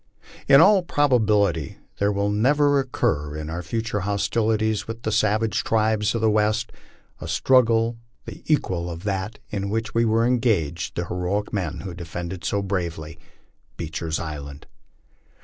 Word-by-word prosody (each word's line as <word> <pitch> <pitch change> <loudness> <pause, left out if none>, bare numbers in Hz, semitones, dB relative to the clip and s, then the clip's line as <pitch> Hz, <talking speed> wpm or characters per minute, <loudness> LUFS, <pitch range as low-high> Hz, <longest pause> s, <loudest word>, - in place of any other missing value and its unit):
In 135 - +8
all 200 -1 +6
probability 105 - +1 0.2
there 100 +1 +2
will 100 0 0
never 145 +6 +3
occur, 75 - -1
in 75 +1 -5
our 85 +2 -3
future 110 +4 -3
hostilities 105 +2 0
with 115 0 -7
the 110 - -1
savage 110 +1 +1
tribes 110 -1 +1
of 115 - -1
the 110 - +3
West, 110 +1 +1 0.5
a 80 - -7
struggle 115 +4 +3 0.3
the - - -9
equal 90 - 0
of 85 +1 -7
that 100 +1 -3
in 100 -1 -3
which 110 +1 -2
were 115 0 +2
engaged 110 - 0
the 85 - -2
heroic 90 +5 -2
men 90 -5 -3
who 95 -3 -6
defended 85 +1 -6
so 100 0 -1
bravely 85 -4 -4 0.3
" - - -40
Beecher's 80 -1 -3
Island." 75 -3 -7
105 Hz, 150 wpm, -23 LUFS, 85-115 Hz, 0.5 s, In